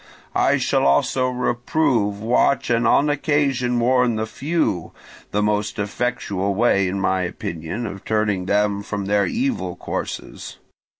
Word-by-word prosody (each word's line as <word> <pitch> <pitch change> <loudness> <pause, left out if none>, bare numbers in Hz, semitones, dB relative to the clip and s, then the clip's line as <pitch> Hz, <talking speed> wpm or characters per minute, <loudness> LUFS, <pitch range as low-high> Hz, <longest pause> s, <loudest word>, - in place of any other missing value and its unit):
I - - +3
shall - - +1
also 130 - +2
reprove, 125 -3 0
watch, 125 +3 +2
and 115 0 +2
on 145 - +4
occasion 140 -4 +1
warn 125 -1 +3
the 110 0 -1
few—the 110 - -3
most 105 0 0
effectual 100 -2 -2
way, 100 -3 +3
in 95 +2 -2
my 95 -1 +1
opinion, 85 +4 -4
of 100 -2 -7
turning 105 -4 0
them 100 0 +1
from 100 -1 -4
their 100 0 +2
evil 235 - -2
courses. - - -6
110 Hz, 130 wpm, -21 LUFS, 100-125 Hz, -, on